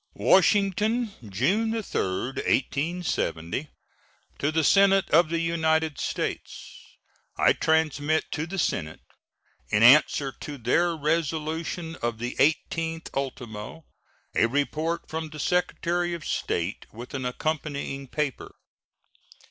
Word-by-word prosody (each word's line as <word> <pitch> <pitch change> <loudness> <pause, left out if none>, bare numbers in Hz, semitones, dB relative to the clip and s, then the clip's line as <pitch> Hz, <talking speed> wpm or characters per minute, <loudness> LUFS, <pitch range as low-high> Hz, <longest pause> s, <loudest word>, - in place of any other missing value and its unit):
WASHINGTON, 205 - +2
June 205 - +1
3, - - -1
1870. 135 - -1 0.7
To 145 - +1
the 160 0 +1
Senate 195 +3 +5
of 165 +1 +5
the 165 - 0
United 160 -2 +1
States: - - -5 0.4
I - - +5
transmit 155 -1 +1
to 160 +2 -2
the 195 +3 -5
Senate, 80 - -1 0.7
in 105 - +3
answer 135 +1 +6
to 145 -1 -7
their 165 +8 +1
resolution 160 +1 -2
of 120 -1 -2
the 120 +2 -4
18th 165 +2 0
ultimo, 130 +1 -5 0.5
a 115 - +3
report 155 +6 -1
from 160 0 -4
the 150 0 -10
Secretary 175 0 0
of 160 -5 -9
State, 85 +4 -2
with 120 +3 -10
an 135 -1 -3
accompanying 140 0 -3
paper. 140 -1 -3
155 Hz, 110 wpm, -26 LUFS, 135-170 Hz, 0.7 s, answer